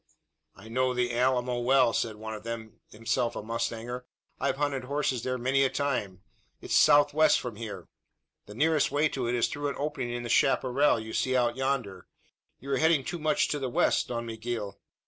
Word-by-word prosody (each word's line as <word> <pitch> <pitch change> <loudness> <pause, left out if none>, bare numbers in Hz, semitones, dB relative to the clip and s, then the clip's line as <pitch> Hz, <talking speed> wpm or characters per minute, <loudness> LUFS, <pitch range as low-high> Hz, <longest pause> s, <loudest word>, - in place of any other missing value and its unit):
"I - - -14
know 130 +2 0
the 125 -1 0
Alamo 125 0 +1
well," 120 -1 +3
said 110 -2 -1
one 110 +1 -7
of 105 - -7
them, 115 -1 -7
himself 115 +2 -1
a - - -5
mustanger. 115 +2 -4 0.3
"I've 135 0 0
hunted 140 -3 -1
horses 140 -3 -1
there 125 +1 -2
many 130 +3 +1
a 135 - +3
time. 105 -11 -2 0.4
It's - - -5
southwest 145 +1 +5
from 120 -4 -6
here. 110 -1 -7 0.6
The 105 - -10
nearest 155 +3 +2
way 150 +2 +2
to 130 -4 -3
it 120 - 0
is 120 - +2
through 145 0 -3
an 140 - -5
opening 145 -4 -3
in 120 0 -4
the - - -5
chapparal 135 +1 +3
you 110 0 -7
see 130 0 0
out 120 -1 +2
yonder. 130 -9 -2 0.5
You 140 +2 -7
are - - +2
heading 160 -3 +3
too 175 - -4
much 155 -1 +1
to 145 - -1
the 130 -2 -2
west, - - +2
Don 120 -1 -4
Miguel!" 115 -2 -5
125 Hz, 195 wpm, -28 LUFS, 115-140 Hz, 0.6 s, southwest